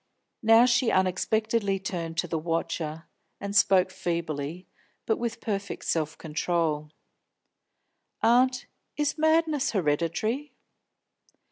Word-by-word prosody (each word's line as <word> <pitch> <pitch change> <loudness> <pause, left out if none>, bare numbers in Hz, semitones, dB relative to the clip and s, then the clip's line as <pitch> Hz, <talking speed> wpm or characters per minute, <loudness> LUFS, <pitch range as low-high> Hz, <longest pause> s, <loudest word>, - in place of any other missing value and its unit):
Now 225 +2 +6
she 250 -1 +3
unexpectedly 200 +2 +1
turned 170 -4 -5
to 175 - 0
the 160 -1 -2
watcher, 165 -1 -3 0.4
and 200 0 -5
spoke 190 -3 +4
feebly, 170 -1 -4 0.4
but 220 - +1
with 235 -1 -3
perfect 200 -3 -4
self 155 -1 -1
control. 155 -1 -1 1.3
"Aunt, 250 +2 +3 0.3
is 295 +1 -1
madness 315 -3 +2
hereditary?" 185 - -1
190 Hz, 100 wpm, -27 LUFS, 165-230 Hz, 1.3 s, Now